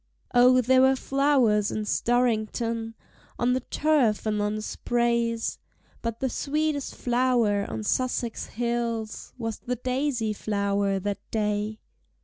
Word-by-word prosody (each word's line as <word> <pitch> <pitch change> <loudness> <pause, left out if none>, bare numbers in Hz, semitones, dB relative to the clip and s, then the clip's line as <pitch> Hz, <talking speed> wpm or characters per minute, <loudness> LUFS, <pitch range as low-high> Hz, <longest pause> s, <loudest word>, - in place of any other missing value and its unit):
Oh, 250 +1 +6
there 255 +2 +4
were 265 0 +5
flowers 260 -7 +2
in 215 - -3
Storrington 230 -1 0 0.4
On 245 +1 +2
the 255 - +1
turf 260 -5 +1
and 210 -1 0
on 210 +1 0
the 215 - -3
sprays; 235 -1 0 0.4
But 230 -1 -3
the 265 - +1
sweetest 295 +2 -1
flower 240 -5 +1
on 110 -1 -4
Sussex 245 - -1
hills 235 -2 -3
Was 225 -3 -4
the 250 +1 -3
Daisy 250 -2 -1
flower 200 -1 0
that 200 +1 -3
day! 210 0 -1
235 Hz, 125 wpm, -26 LUFS, 215-255 Hz, 0.4 s, Oh